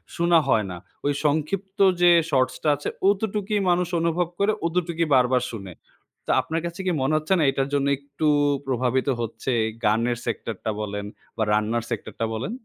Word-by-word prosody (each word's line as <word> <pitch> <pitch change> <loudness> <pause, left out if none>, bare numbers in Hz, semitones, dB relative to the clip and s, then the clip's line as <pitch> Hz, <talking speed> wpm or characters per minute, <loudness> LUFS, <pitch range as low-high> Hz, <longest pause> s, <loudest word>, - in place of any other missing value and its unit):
শুনা 170 0 +4
হয় 110 -2 +3
না। 90 - -6 0.3
ওই 145 - +2
সংক্ষিপ্ত 185 +7 -1 0.2
যে 175 0 +7 0.2
শর্টস 130 -2 +2
টা 155 - +3
আছে, 145 - -4 0.2
অতটুকই 205 0 0
মানুষ 175 0 +2
অনুভব 170 +1 +1
করে, 200 +2 +3 0.2
অতটুকই 170 -1 -1
বারবার 125 0 +3
শুনে। 100 -5 -8 0.5
তা - - +1
আপনার 165 +1 -3
কাছে 170 +1 -6
কি 185 - +2
মনে 135 +4 +1
হচ্ছে 155 +4 0
না 165 - +2
এইটার 135 0 -1
জন্য 140 -1 +1
একটু 140 +2 -3 0.4
প্রভাবিত 130 0 0
হচ্ছে 115 +3 -3 0.3
গানের 115 +3 +2
সেক্টর 115 - -3
টা 110 - +1
বলেন 105 -1 -4 0.3
বা 110 - +1
রান্নার 110 +2 0
সেক্টর - - -5
টা - - +3
বলেন? 120 - -4
145 Hz, 175 wpm, -24 LUFS, 120-170 Hz, 0.5 s, যে